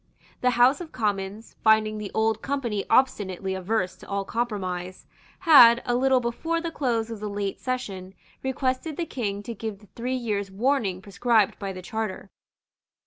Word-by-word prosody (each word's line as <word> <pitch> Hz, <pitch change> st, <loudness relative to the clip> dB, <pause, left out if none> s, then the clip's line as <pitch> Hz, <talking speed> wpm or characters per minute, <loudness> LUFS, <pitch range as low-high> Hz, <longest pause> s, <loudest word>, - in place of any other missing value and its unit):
The 250 Hz, -, +4 dB
House 255 Hz, +6 st, +5 dB
of 330 Hz, -, -8 dB
Commons, 205 Hz, -1 st, -3 dB
finding 215 Hz, -1 st, +4 dB
the 210 Hz, -2 st, -5 dB
Old 220 Hz, 0 st, +1 dB
Company 240 Hz, -8 st, -2 dB
obstinately 195 Hz, -7 st, +1 dB
averse 190 Hz, 0 st, -1 dB
to -, -, -14 dB
all 200 Hz, 0 st, -2 dB
compromise, 185 Hz, -6 st, -3 dB, 0.4 s
had, 245 Hz, -9 st, +8 dB
a 245 Hz, -, 0 dB
little 260 Hz, +1 st, +3 dB
before 250 Hz, +8 st, -2 dB
the 335 Hz, 0 st, -4 dB
close 230 Hz, -7 st, -1 dB
of 225 Hz, -, -6 dB
the 210 Hz, 0 st, -4 dB
late 200 Hz, -1 st, -3 dB
session, 195 Hz, -7 st, -4 dB, 0.3 s
requested 265 Hz, +3 st, -2 dB
the 345 Hz, -, -1 dB
King 205 Hz, -9 st, -3 dB
to 235 Hz, -, -5 dB
give 220 Hz, -1 st, -5 dB
the 210 Hz, 0 st, -20 dB
three 250 Hz, +2 st, -2 dB
years' 210 Hz, -5 st, -2 dB
warning 200 Hz, -3 st, 0 dB
prescribed 215 Hz, +1 st, +2 dB
by 195 Hz, -1 st, -3 dB
the 185 Hz, -1 st, -8 dB
Charter. 205 Hz, -1 st, -4 dB
220 Hz, 165 wpm, -25 LUFS, 200-255 Hz, 0.4 s, had